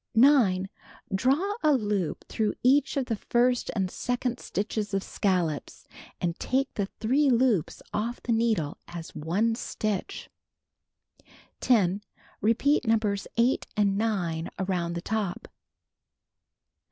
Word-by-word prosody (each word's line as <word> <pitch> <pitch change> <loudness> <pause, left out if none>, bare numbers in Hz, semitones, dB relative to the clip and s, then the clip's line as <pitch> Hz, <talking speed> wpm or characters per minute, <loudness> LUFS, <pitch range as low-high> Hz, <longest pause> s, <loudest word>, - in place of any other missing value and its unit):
9. 225 -8 +5 0.5
Draw 275 - +2
a 305 -1 +4
loop 205 - -1
through 215 -2 -1
each 275 +3 +3
of 270 - +1
the 230 - -1
first 245 +3 +1
and 190 -3 0
second 245 0 -2
stitches 205 0 -3
of 195 - 0
scallops, 175 -7 -1 0.3
and 170 -1 -2
take 270 +1 0
the 200 -2 -1
3 270 +6 +3
loops 240 - +2
off 230 +3 -2
the 240 - -1
needle 225 -10 +1
as 170 -1 -8
one 195 +9 0
stitch. 215 -4 -3 1.3
10. 205 -5 +3 0.4
Repeat 250 +7 +3
Nos. 215 -3 +1
8 240 +3 +2
and 200 -2 +3
9 180 -7 -1
around 180 -3 -1
the 170 - -3
top. 205 -2 -3
215 Hz, 120 wpm, -27 LUFS, 190-245 Hz, 1.3 s, 9